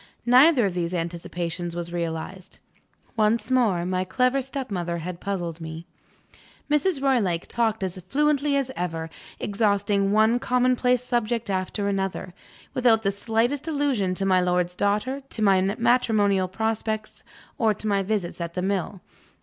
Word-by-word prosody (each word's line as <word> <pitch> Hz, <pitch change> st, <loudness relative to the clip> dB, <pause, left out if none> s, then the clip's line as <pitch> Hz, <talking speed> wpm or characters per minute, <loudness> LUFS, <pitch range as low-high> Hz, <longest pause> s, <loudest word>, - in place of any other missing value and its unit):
Neither 255 Hz, +1 st, +6 dB
of 190 Hz, -, -1 dB
these 175 Hz, 0 st, -2 dB
anticipations 170 Hz, 0 st, -4 dB
was 170 Hz, 0 st, -5 dB
realized. 170 Hz, +2 st, -5 dB, 0.6 s
Once 220 Hz, +2 st, +1 dB
more, 215 Hz, -9 st, +2 dB
my 185 Hz, 0 st, 0 dB
clever 250 Hz, +8 st, +1 dB
stepmother 205 Hz, -11 st, -3 dB
had 170 Hz, +1 st, -6 dB
puzzled 175 Hz, -4 st, -4 dB
me. 160 Hz, +1 st, -7 dB, 0.9 s
Mrs. 300 Hz, -1 st, +1 dB
Roylake 205 Hz, -11 st, +1 dB
talked 220 Hz, -3 st, 0 dB
as 185 Hz, 0 st, -4 dB
fluently 295 Hz, 0 st, +2 dB
as 270 Hz, -2 st, 0 dB
ever; 165 Hz, -2 st, -4 dB, 0.3 s
exhausting 200 Hz, -1 st, +1 dB
one 220 Hz, +3 st, +4 dB
common 250 Hz, 0 st, +2 dB
place 250 Hz, 0 st, +1 dB
subject 235 Hz, -3 st, -1 dB
after 190 Hz, +2 st, -2 dB
another, 195 Hz, -2 st, -2 dB, 0.4 s
without 230 Hz, -3 st, +3 dB
the 195 Hz, -, +2 dB
slightest 230 Hz, +8 st, -1 dB
allusion 275 Hz, -, 0 dB
to 195 Hz, -, -1 dB
my 185 Hz, -1 st, +4 dB
lord's 180 Hz, 0 st, 0 dB
daughter, 210 Hz, +8 st, 0 dB
to 220 Hz, -, -3 dB
my 195 Hz, -2 st, +5 dB, 0.2 s
matrimonial 215 Hz, -5 st, +2 dB
prospects, 220 Hz, +2 st, -3 dB, 0.4 s
or 225 Hz, -3 st, +3 dB
to 215 Hz, -, -9 dB
my 200 Hz, -1 st, +2 dB
visits 195 Hz, -4 st, -2 dB
at 170 Hz, 0 st, -5 dB
the 180 Hz, -, -2 dB
mill. 190 Hz, -1 st, -2 dB
200 Hz, 145 wpm, -25 LUFS, 180-240 Hz, 0.9 s, Neither